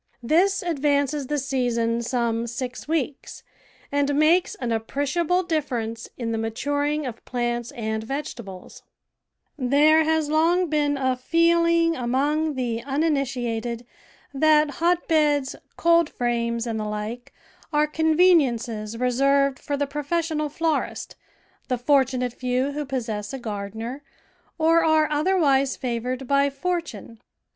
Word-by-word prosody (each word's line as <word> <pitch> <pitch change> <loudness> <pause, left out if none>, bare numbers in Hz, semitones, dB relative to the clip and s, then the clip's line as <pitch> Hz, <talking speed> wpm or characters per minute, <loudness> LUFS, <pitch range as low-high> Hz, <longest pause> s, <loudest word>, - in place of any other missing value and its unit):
This 365 +9 +2
ad 340 -5 -2
vances 285 -1 +1
the 295 - -1
season 240 -4 0
some 235 -1 -1
six 250 +3 -6
weeks, 300 -3 -3 0.5
and 285 0 +1
makes 320 +5 +3
an 245 -2 -4
appreciable 285 +10 0
diiference 245 -9 -3
in 230 -2 -3
the 225 - -1
maturing 285 +6 -1
of 235 -3 -7
plants 240 -1 -2
and 220 -3 -3
vegetables. 230 -7 -7 0.8
THE 255 - -2
VEGETABLE - - -1
GARDEN 280 +2 +3 0.3
There 320 - +2
has 310 -2 -1
long 335 +3 +2
been 290 -2 +1
a 260 -1 +1
feeling 335 +4 +2
among 290 +5 0
the 235 -3 -2
uniniti 275 -3 0
ated 235 +1 -4 0.5
that 300 +1 +4
hotbeds, 310 -5 +2 0.2
coldframes, 240 -8 +1
and 225 -2 -3
the 215 - -3
like 210 +3 -5 0.4
are 300 -1 +3
con 315 +1 0
veniences 235 -11 +2
reserved 275 +2 +2
for 285 - -3
the 285 - 0
professional 305 +2 -2
florist, 320 +1 -2 0.5
the 250 - 0
fortunate 255 -1 +1
few 255 +2 -1
who 295 +1 -4
possess 230 -5 -4
a - - -3
gardener, 225 +4 -5 0.6
or 330 0 +4
are 315 -1 +3
other 325 +6 +1
wise 275 -5 +2
favoured 250 +1 -3
by 280 +1 +3
fortune. 280 - -4
275 Hz, 135 wpm, -24 LUFS, 240-310 Hz, 0.8 s, that